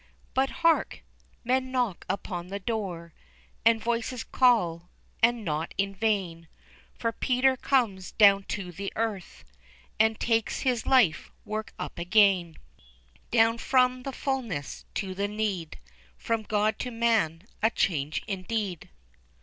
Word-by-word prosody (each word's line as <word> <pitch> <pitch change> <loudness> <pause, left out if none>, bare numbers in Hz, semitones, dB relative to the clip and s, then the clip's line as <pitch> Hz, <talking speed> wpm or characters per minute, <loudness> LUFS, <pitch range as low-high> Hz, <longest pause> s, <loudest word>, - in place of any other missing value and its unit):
But 270 +1 +2 0.2
hark! 330 -1 +2 0.4
men 260 +1 0
knock 245 -8 -1
upon 180 -3 -3
the 195 +2 -4
door, 185 -6 -4 0.5
And 225 +1 +5
voices 235 +1 -2
call, 180 -10 +2 0.3
and 230 -1 +3
not 155 -1 -3
in 195 0 0
vain, 185 -6 -1 0.5
For 230 - -1
Peter 260 +2 +2
comes 230 -9 0
down 200 -2 +6
to 190 -4 -4
the 195 +3 -5
earth, 210 - -3 0.6
And 220 0 +3
takes 225 -1 0
his 250 -4 0
life 240 -12 +3 0.2
work 215 +1 -5
up - - -6
again, 180 -2 +3 0.7
Down 230 0 +3
from 255 0 +2
the 275 - -5
fullness 245 - -4
to 190 -3 -3
the 200 +2 -1
need, 205 -6 -3 0.4
From 230 -1 -1
God 215 0 0
to 250 - -3
man, 225 -9 +1 0.2
a 220 - +4
change 155 -9 -1
indeed. 195 -2 -3
215 Hz, 130 wpm, -27 LUFS, 185-235 Hz, 0.7 s, down